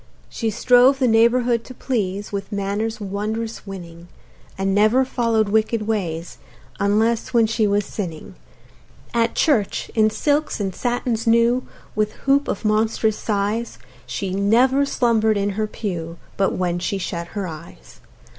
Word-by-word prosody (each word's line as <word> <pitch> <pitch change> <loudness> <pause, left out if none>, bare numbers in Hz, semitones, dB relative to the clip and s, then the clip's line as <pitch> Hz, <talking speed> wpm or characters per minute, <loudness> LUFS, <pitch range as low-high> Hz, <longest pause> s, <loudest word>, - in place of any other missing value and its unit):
She 225 - -2
strove 245 +4 +5
the 260 -2 +2
neighborhood 235 +1 +3
to 255 - -11
please 205 -6 -2
With 200 0 -5
manners 205 +3 -2
wondrous 210 +2 -4
winning; 170 -3 -9 0.5
And 195 0 0
never 215 +6 +4
follow'd 230 -4 +1
wicked 220 +1 +1
ways 175 -6 -3 0.4
Unless 220 +4 +1
when 230 -1 +5
she 220 -1 +1
was 205 0 +1
sinning. 170 -7 -6 0.8
At 230 -1 +1
church, 230 -11 +1
in 215 -1 +4
silks 290 +7 0
and 195 -2 -2
satins 240 -1 -2
new, 235 +2 +3 0.3
With 215 0 0
hoop 275 +1 +3
of 205 - -3
monstrous 220 0 +1
size, 210 +2 -2 0.3
She 195 -2 -3
never 245 +8 +3
slumber'd 220 -5 +2
in 200 0 0
her 215 +2 -2
pew 170 -6 -5 0.2
But 195 - +1
when 175 -1 -1
she 200 +3 -2
shut 175 0 -5
her 200 - -1
eyes. 165 -1 -11
215 Hz, 145 wpm, -21 LUFS, 200-235 Hz, 0.8 s, strove